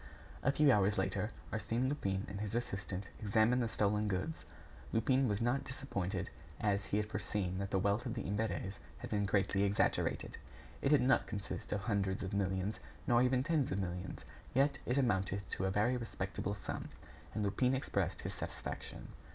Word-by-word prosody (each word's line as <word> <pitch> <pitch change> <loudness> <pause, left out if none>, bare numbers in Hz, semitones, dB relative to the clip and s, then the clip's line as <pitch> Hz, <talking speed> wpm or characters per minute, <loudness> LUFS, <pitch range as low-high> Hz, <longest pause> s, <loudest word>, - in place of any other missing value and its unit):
A 135 - +3
few 145 0 +5
hours 105 -2 +4
later, 95 +3 0 0.2
Arsène 115 +4 0
Lupin 100 -9 -1
and 100 0 -5
his 105 +1 -3
assistant 100 -4 -2 0.2
examined 110 +4 +4
the 115 - 0
stolen 105 0 +2
goods. 105 - -2 0.5
Lupin 130 +4 +3
was 105 +1 0
not 120 +3 +2
disappointed, 100 -9 -3 0.3
as 100 -1 +1
he 105 - 0
had 105 - +1
foreseen 95 -3 -2
that 100 0 -2
the 95 - +1
wealth 100 +6 +1
of 120 - -3
the 115 - -2
Imberts 100 -1 -2 0.2
had - - -7
been 100 -1 +1
greatly 100 0 +2
exaggerated. 100 0 +1 0.4
It - - +2
did 150 -2 +6
not 130 +1 +4
consist 100 -3 -5
of 100 - 0
hundreds 100 -2 0
of 95 +2 -4
millions, 95 +1 0 0.3
nor 120 0 +5
even 130 0 +3
tens 150 -3 +1
of 95 - 0
millions. 90 -1 -3 0.3
Yet 140 +2 +3
it 125 - +2
amounted 100 -6 +1
to 95 - -1
a - - +2
very 105 +6 +2
respectable 100 -3 -3
sum, - - -5 0.5
and 105 - 0
Lupin 125 +6 +2
expressed 130 - -1
his - - -4
satisfaction. - - -5
105 Hz, 175 wpm, -35 LUFS, 95-125 Hz, 0.5 s, did